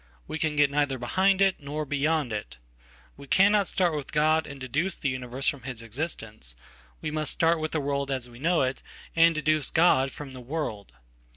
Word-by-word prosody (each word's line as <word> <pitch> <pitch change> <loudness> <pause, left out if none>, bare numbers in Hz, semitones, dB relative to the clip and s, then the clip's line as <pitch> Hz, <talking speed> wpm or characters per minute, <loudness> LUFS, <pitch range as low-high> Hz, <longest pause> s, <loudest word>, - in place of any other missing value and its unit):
We 160 - -4
can 155 -2 -1
getneither 145 -2 +2
behind 190 +10 +3
it 195 -1 +2
nor 150 +1 -4
beyond 145 -2 0
it. 65 - -5 0.6
We 140 0 -12
cannot 200 +4 +4
start 175 -4 +1
with 145 -2 -5
God 155 +1 +3
anddeduce 140 +7 -3
the 140 - 0
universe 130 +1 -1
from 140 - 0
his 125 -2 -6
existence; 110 - -5 0.5
we 155 - -3
must 155 0 -1
start 165 0 +2
with 155 0 -3
theworld 140 -2 -1
as 130 -3 -2
we 120 0 -14
know 165 +1 +2
it, 130 +1 -2 0.3
and 165 0 +5
deduce 155 -1 +1
God 135 -5 +4
from 140 -3 -9
the 130 - -9
world. 120 -7 -4
145 Hz, 180 wpm, -27 LUFS, 130-160 Hz, 0.6 s, and